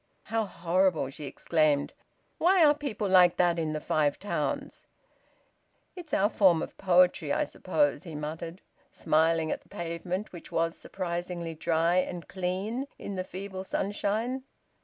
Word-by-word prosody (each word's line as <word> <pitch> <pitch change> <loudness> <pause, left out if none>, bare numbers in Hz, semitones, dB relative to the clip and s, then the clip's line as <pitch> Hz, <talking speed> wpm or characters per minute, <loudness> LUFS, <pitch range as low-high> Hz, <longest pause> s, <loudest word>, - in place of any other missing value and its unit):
"How 225 -1 +2
horrible!" 175 -5 +1
she 150 +2 -8
exclaimed. 150 0 +1 0.5
"Why 355 -1 +5
are 295 - +6
people 275 -9 -3
like 180 -2 +6
that 175 -1 +3
in 155 -1 -1
the 155 - -2
Five 150 -1 +1
Towns?" 205 - -3 1.1
"It's 345 -5 -10
our 200 - +3
form 185 -6 +4
of - - -8
poetry, 180 -1 +3
I - - +2
suppose," 295 -1 0
he 165 -5 -8
muttered, 160 +4 -6 0.3
smiling 160 0 +2
at - - -3
the - - -27
pavement, 175 +4 -4
which 175 - -10
was 165 0 0
surprisingly 175 -2 -4
dry 165 +2 +1
and 180 -1 -1
clean 195 +8 -3
in 200 - -6
the 185 - -2
feeble 190 0 -6
sunshine. 210 +6 -1
180 Hz, 145 wpm, -29 LUFS, 165-200 Hz, 1.1 s, are